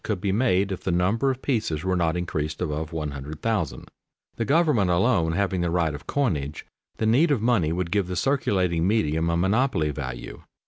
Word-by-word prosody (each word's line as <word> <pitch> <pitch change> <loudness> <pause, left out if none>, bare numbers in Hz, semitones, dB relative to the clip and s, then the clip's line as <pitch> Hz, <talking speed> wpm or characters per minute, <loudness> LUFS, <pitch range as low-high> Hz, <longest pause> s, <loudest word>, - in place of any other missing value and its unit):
could 105 -4 -2
be 100 +1 -1
made 100 -3 +2
if 95 - -4
the 95 - 0
number 95 +10 +1
of 130 0 -3
pieces 105 - -1
were 95 0 0
not 85 -1 +1
increased 80 -3 -3
above 80 -1 -3
100,000. 75 +4 -3 0.5
The 115 - -2
government 145 - +3
alone 85 -2 +2
having 95 0 0
the 85 - 0
right 85 -2 +1
of 75 - -9
coinage, 75 - -1 0.3
the 110 - -1
need 130 +10 +4
of 145 -5 +2
money 105 -9 +2
would 85 0 -2
give 100 -3 +1
the 90 - -4
circulating 90 -9 +1
medium 80 -6 +1
a 85 - +1
monopoly 95 - +1
value. 65 -3 -6
90 Hz, 185 wpm, -25 LUFS, 80-110 Hz, 0.5 s, need